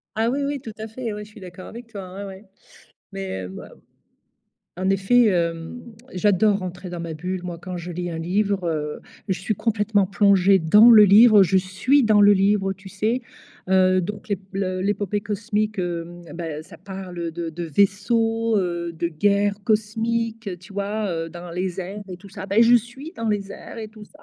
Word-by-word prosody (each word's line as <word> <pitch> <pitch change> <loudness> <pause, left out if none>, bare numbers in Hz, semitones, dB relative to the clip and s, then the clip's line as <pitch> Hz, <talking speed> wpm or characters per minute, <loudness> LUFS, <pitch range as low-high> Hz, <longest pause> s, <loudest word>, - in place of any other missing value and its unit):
Ah 225 +2 +1
oui 275 +3 -1
oui, 285 0 -2
tout 225 - -8
à 220 - -5
fait, 225 -1 -5
oui, 210 0 -6
je 210 - -13
suis 210 - -14
d'accord 185 0 -10
avec 235 +1 -10
toi, 195 -5 -9
ou - - -7
ais, - - -5
ouais, 195 +1 -10 0.7
mais 95 -1 -5
bah, 95 - -10 1.1
en 190 +1 0
effet, 195 +6 +4
hem, 170 +4 -1 0.3
j'adore 200 +2 +3
rentrer 180 0 -7
dans 175 -1 -6
ma 165 -1 -5
bulle, 180 +3 -4
moi, 175 -1 -5
quand 180 +1 -7
je 175 +1 -6
lis 175 +1 -4
un 165 - -4
livre. 195 +2 0
Heu, 150 -2 -3 0.3
je 185 - 0
suis 200 +2 -2
complètement 210 -2 +1
plongée 195 -1 +4
dans 210 +9 +7
le 215 -2 +9
livre, 210 +1 +7
je 190 0 +4
suis 190 +10 +2
dans 215 -2 +4
le 205 0 +7
livre, 195 0 +2
tu 190 +1 -13
sais, 215 +6 -1 0.5
heu, 185 0 +4
donc 205 +3 -6 0.3
le 185 -1 -2
l'épopée 205 0 -1
cosmique, 215 -1 -2
heu, 175 0 -4
ben, 165 -3 -5
ça 165 -1 -14
parle, 190 -2 -8
heu, 170 -1 -3
de 170 0 -4
de 170 +2 -6
vaisseaux, 225 - +1
heu, 175 -2 -2
de 170 +1 -2
guerres 200 +4 +1
cosmiques, 225 0 -1
tu 190 +2 -15
vois, 205 +1 -2
heu, 165 0 -3
dans 175 0 -9
les 180 +1 -3
airs 195 +3 -6
et 180 - -7
tout 195 +2 -14
ça, 195 0 -8
Bah, 200 +4 +3
je 235 +1 +7
suis 255 - -4
dans 230 -1 -2
les 200 -1 -2
airs - - -10
et 220 -1 -5
tout 215 0 -13
ça. - - -20
195 Hz, 200 wpm, -23 LUFS, 180-215 Hz, 1.1 s, le